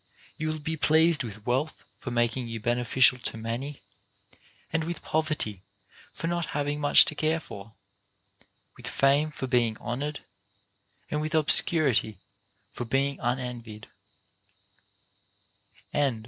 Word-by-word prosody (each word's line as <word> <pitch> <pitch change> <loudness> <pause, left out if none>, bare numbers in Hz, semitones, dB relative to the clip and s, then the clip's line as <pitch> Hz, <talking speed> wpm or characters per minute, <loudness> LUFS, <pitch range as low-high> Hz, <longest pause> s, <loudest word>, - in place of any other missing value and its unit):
You 155 - -3
will 155 0 -2
be 160 +2 -3
pleased 160 +1 +3
with 110 -3 -9
wealth 135 +6 -1 0.2
for - - -6
making 120 +1 0
you 115 -1 -5
beneficial 120 +2 +3
to 115 - -5
many, 120 +6 -5 0.9
and 165 0 +1
with 170 +1 -5
poverty 155 - -1 0.5
for - - -6
not 170 0 -1
having 145 0 -1
much 145 - +7
to - - -2
care 155 +2 0
for; 110 -7 -11 1.0
with - - -9
fame 140 +3 +2
for 150 -3 -5
being 120 -4 +1
honored, 145 +5 -4 0.9
and 150 - -1
with 155 +1 -2
obscurity 145 - +5 0.5
for - - -5
being 135 +4 0
unenvied. 120 -3 -4
135 Hz, 120 wpm, -27 LUFS, 120-155 Hz, 1.0 s, much